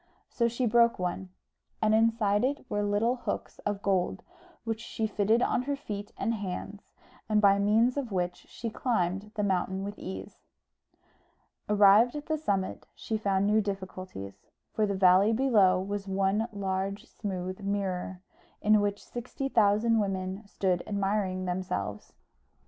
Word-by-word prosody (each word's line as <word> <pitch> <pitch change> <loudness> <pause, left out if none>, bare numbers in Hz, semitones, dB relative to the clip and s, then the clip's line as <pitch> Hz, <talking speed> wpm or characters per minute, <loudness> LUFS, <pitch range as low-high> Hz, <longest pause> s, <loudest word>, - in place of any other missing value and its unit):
So 235 -1 +1
she 235 +2 -1
broke 235 +1 +4
one, 180 +1 -3 0.5
and 215 0 +2
inside 220 -2 +3
it 280 +2 -1
were 205 -4 -1
little 205 +5 +1
hooks 240 - -5
of 205 -1 -2
gold, 190 -3 0 0.4
which 225 -1 -3
she 225 -1 -3
fitted 215 +3 +2
on - - +1
her 280 +2 -2
feet 205 -6 -6
and 230 - 0
hands, 200 0 -5 0.5
and 215 -1 +3
by 200 -1 +5
means 225 +6 +3
of 260 -6 -3
which 180 -2 -2
she 230 -1 -5
climbed 200 -4 -1
the 210 - -1
mountain 190 0 0
with 205 +1 -6
ease. 190 - -7 1.3
Arrived 210 +4 +6
at 295 0 -5
the 315 -1 -1
summit 195 -10 -2
she 220 - -4
found 200 -2 +1
new 210 +1 +3
difficulties; 185 - -6 0.3
for 215 -1 +1
the 200 - -1
valley 190 +3 +5
below 215 -7 +4
was 200 +1 -4
one 195 +3 +1
large 195 0 -3
smooth 185 -3 -5
mirror, 190 -2 -3 0.4
in 210 0 +4
which 205 0 -2
sixty 255 +3 -5
thousand 220 0 +3
women 190 0 -2
stood 185 -3 0
admiring 195 -2 -1
themselves. 175 - -3
205 Hz, 150 wpm, -29 LUFS, 190-225 Hz, 1.3 s, Arrived